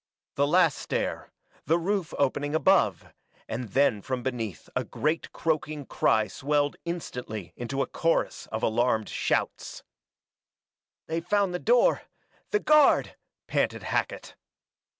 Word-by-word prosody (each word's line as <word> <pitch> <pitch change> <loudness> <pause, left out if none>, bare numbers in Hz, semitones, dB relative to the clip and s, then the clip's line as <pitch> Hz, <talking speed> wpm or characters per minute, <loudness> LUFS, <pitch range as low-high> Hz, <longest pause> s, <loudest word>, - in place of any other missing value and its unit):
The 140 +1 +2
last 165 -2 +3
stair - - -3 0.4
the 165 - +4
roof 185 0 -1
opening 145 +2 0
above; 190 +4 +3 0.4
and 120 +3 -4
then 125 -3 +2
from 125 +3 -3
beneath 115 -8 -4
a - - +1
great 155 +2 -2
croaking 155 -2 -2
cry 110 -3 +2
swelled 145 +4 0
instantly 125 - -5
into 135 +3 -2
chorus 165 0 -1
of 110 0 -3
a - - +5
alarmed 110 -1 +1
shouts. - - -2 1.2
"They've 165 +1 -3
found 200 0 +1
the 180 - -2
door 240 +4 +3 0.5
the 420 - +2
guard!" 305 -5 +4 0.3
panted - - -1
Hackett. - - -2
145 Hz, 125 wpm, -27 LUFS, 125-170 Hz, 1.2 s, a